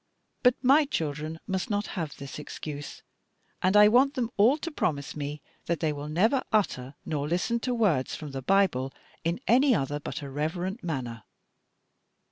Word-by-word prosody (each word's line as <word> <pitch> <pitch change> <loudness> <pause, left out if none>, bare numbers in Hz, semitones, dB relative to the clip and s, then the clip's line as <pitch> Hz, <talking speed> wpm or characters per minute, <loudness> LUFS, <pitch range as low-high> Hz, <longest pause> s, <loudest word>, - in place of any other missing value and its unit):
But 250 -1 +5
my 280 +4 +6
children 155 - -3
must 190 -1 -2
not 205 0 0
have 165 -7 -4
this 140 +1 -7
excuse, 145 0 -7 0.6
and 190 +3 +4
I 210 0 +9
want 260 +6 +4
them 240 -2 -1
all 230 +8 +5
to 335 +2 -5
promise 145 - -2
me 145 -1 -5 0.2
that 170 -2 0
they 155 -2 0
will 145 +1 -6
never 220 - +3
utter 140 -11 0
nor 145 -2 -2
listen 180 +9 0
to 250 +1 -1
words 180 - +1
from 150 -2 -7
the 135 0 -5
Bible 135 -5 +2 0.3
in 170 +4 -1
any 260 +1 +5
other 145 -1 -1
but 145 - -6
a 140 - -6
reverent 175 - -3
manner." 125 -9 -4
170 Hz, 170 wpm, -28 LUFS, 145-220 Hz, 0.6 s, I